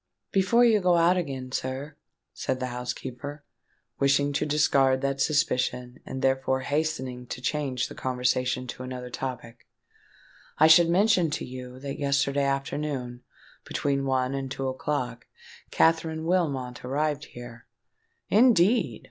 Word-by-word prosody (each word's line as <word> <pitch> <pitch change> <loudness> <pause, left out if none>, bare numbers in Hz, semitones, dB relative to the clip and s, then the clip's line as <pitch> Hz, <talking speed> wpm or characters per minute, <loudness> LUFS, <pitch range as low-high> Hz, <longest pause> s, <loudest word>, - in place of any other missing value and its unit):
"Before 200 +5 +4
you 220 -3 +4
go 180 -1 +3
out 170 +2 +4
again, 135 -7 -4
sir," 130 +4 -4 0.4
said 130 - -2
the 130 - -2
housekeeper, 125 +4 -6 0.6
wishing 140 +1 +2
to 140 - 0
discard 135 -3 +3
that 140 0 -1
suspicion, 125 -4 0
and 130 - -5
therefore 130 0 +1
hastening 130 -4 -2
to 125 - -6
change 130 -1 -1
the - - -10
conversation 125 0 -1
to 125 - -7
another 125 -1 -6
topic, 120 -3 -6 0.9
"I 155 - +6
should 165 +1 +7
mention 185 -1 +3
to 150 - -3
you 125 0 -9
that 140 0 -5
yesterday 140 0 +1
afternoon—between 140 0 -3
one 130 -1 0
and 135 -1 -3
two 135 +1 -3
o'clock—Katherine 150 +5 -2
Wilmot 140 -9 -1
arrived 145 +3 -1
here——" 120 -1 -11 0.6
"Indeed! 225 -1 +4
135 Hz, 125 wpm, -26 LUFS, 130-155 Hz, 0.9 s, should